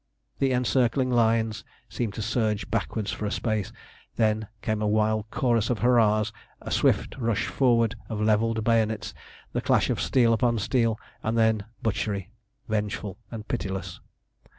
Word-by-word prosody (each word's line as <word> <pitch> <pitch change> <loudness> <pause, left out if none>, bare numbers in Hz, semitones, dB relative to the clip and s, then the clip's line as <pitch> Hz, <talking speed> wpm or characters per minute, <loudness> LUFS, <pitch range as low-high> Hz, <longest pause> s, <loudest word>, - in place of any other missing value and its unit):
The 135 -1 +2
encircling 125 0 +2
lines 115 -2 +2 0.2
seemed 110 -5 -3
to 110 - -3
surge 110 -4 -1
backwards 105 -2 -1
for 105 - -3
a - - -3
space. 110 -4 -1 0.4
Then 110 -1 +1 0.2
came 110 -1 -1
a 105 - +1
wild 110 0 +1
chorus 115 -3 +1
of 120 - +1
hurrahs, 110 -3 +3 0.3
a - - -8
swift - - +2
forward 115 0 +1
rush - - -22
of 110 -2 -3
levelled 110 +1 +2
bayonets, 110 -3 +1 0.4
the - - 0
clash - - +2
of - - -1
steel 120 -3 +3
upon 120 0 +2
steel 115 +1 +1 0.2
and 110 +1 -1
then 110 -2 +2 0.2
butchery, 100 -2 -2 0.4
vengeful 105 -2 -2
and 110 -2 -7
pitiless. 95 -1 -4
110 Hz, 150 wpm, -26 LUFS, 105-115 Hz, 0.4 s, hurrahs